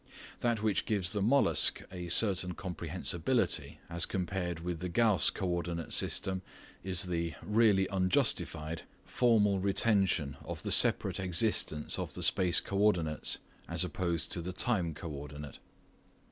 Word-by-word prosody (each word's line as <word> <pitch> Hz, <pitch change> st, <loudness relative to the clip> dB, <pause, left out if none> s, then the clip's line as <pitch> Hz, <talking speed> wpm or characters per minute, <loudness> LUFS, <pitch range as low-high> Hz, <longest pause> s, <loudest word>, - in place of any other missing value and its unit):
That 115 Hz, -3 st, -1 dB
which 105 Hz, -3 st, 0 dB
gives 95 Hz, -5 st, -1 dB
the 105 Hz, -, -3 dB
"mollusc" 110 Hz, -, +3 dB
a 90 Hz, -2 st, -7 dB
certain 90 Hz, -1 st, +2 dB
comprehensibility 85 Hz, -, -2 dB
as 85 Hz, 0 st, +2 dB
compared 90 Hz, -2 st, -3 dB
with 85 Hz, -1 st, -4 dB
the 90 Hz, +1 st, -4 dB
Gauss 110 Hz, 0 st, +3 dB
co 95 Hz, -, -4 dB
ordinate 85 Hz, -1 st, -3 dB
system 95 Hz, -1 st, 0 dB, 0.4 s
is 90 Hz, -2 st, +1 dB
the 85 Hz, -2 st, -3 dB
(really 105 Hz, -3 st, +2 dB
unjustified) 85 Hz, -4 st, 0 dB, 0.2 s
formal 105 Hz, -5 st, +2 dB
retention 95 Hz, -, +1 dB
of -, -, -7 dB
the -, -, -4 dB
separate -, -, +4 dB
existence 90 Hz, -4 st, +1 dB
of -, -, -5 dB
the -, -, -4 dB
space 90 Hz, -2 st, +3 dB
co 100 Hz, -, -4 dB
ordinates 85 Hz, -7 st, +2 dB, 0.3 s
as -, -, +2 dB
opposed 85 Hz, -3 st, -2 dB
to 85 Hz, -, 0 dB
the 90 Hz, +2 st, -6 dB
time 90 Hz, -6 st, 0 dB
co 85 Hz, -, -8 dB
ordinate. 75 Hz, 0 st, -9 dB
90 Hz, 140 wpm, -31 LUFS, 85-100 Hz, 0.4 s, separate